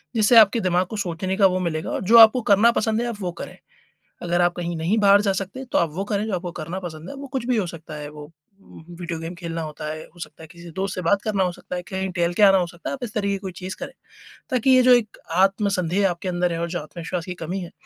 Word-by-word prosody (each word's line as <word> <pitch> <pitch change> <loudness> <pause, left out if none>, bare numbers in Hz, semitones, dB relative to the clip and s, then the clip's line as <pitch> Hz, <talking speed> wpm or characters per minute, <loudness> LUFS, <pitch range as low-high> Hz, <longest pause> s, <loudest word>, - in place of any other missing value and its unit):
जिससे 220 +2 +4
आपके 220 +1 +7
दिमाग 185 -1 +1
को 215 - -6
सोचने 185 -1 -2
का 200 - +5
वो 185 0 -1
मिलेगा 160 -3 -3
और - - -2
जो 225 +5 +6
आपको 225 +2 +8
करना 215 +4 +6
पसंद 220 0 0
है, 240 - -2
आप 235 - -4
वो 180 -1 -2
करें। - - -10 0.7
अगर 175 0 0
आप 175 0 +3
कहीं 175 -1 -3
नहीं 170 +8 0
बाहर 200 0 +6
जा 200 -2 +1
सकते, 195 +7 -5
तो 250 - 0
आप 170 - +1
वो 195 +4 -3
करें 205 0 -1
जो 210 - -2
आपको 180 0 -4
करना 165 +4 -5
पसंद 160 -2 -8
है। - - -7
वो 280 +1 -8
कुछ 260 -3 -4
भी 250 -2 +1
हो 205 - 0
सकता 165 -2 -9
है, 150 -1 -7
वो 150 0 -11 0.3
वीडियो 170 0 -8
गेम 165 +2 -6
खेलना 165 -1 -5
होता 155 0 -7
है 155 0 -6
हो 175 - -18
सकता 165 - -9
है - - -10
किसी 170 0 -12
दोस्त 190 +1 -3
से - - -4
बात 200 +4 +2
करना 200 -3 0
हो 180 - -1
सकता 180 - -7
है, 180 - -4
कहीं 190 +1 -4
टहल 175 0 +1
के 210 - +1
आना 195 -1 +7
हो 180 - 0
सकता 170 0 -8
है, - - -3
आप 275 - -9
इस 210 - -8
तरीके 200 -2 0
की - - -3
कोई 190 -1 -7
चीज़ 185 +1 -6
करें। - - -7 0.6
ताकि 255 +1 +1
ये 255 -1 +7
जो 250 0 +7
एक 230 -3 +1 0.3
आत्मसन्देह 195 -2 0
आपके 175 +2 -4
अंदर 175 -1 0
है 165 - -3
और 170 0 -2
जो 175 - -3
आत्मविश्वास 170 +2 -6
की 180 - -5
कमी 185 +4 -3
है, 175 -2 -8
185 Hz, 280 wpm, -23 LUFS, 170-205 Hz, 0.7 s, आपको